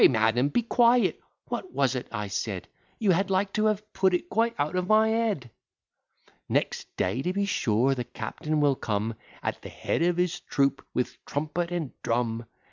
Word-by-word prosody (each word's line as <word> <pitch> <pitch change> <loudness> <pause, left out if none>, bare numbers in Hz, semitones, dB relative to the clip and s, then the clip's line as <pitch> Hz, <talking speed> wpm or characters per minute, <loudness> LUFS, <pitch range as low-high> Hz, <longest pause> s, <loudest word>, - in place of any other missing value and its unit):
"Pray, - - +10
madam, 115 +3 +2
be 235 +11 +1
quiet: 240 +1 +4 0.3
what 370 - -4
was 135 -2 +2
it 125 -2 -4
I 105 -2 -3
said? 100 -1 -3 0.3
You 210 -4 +3
had 195 +3 +2
like 195 +1 +1
to 215 - +2
have 210 0 -2
put 190 -1 +3
it 175 0 -3
quite 230 +2 +2
out 150 +4 -1
of 180 0 0
my 215 +1 +5
head. 215 - 0 1.0
Next - - 0
day 95 +8 0
to 180 - 0
be 200 +2 0
sure, 125 - +2
the 125 -2 -2
captain 150 +7 -3
will 145 -2 +4
come, 110 -1 -1 0.3
At - - -2
the - - -8
head - - -2
of 175 0 +2
his 180 -1 +1
troop, 140 -1 0
with 125 - -2
trumpet 155 +4 -2
and 170 -6 -3
drum. 115 -1 -1
155 Hz, 190 wpm, -27 LUFS, 120-200 Hz, 1.0 s, Pray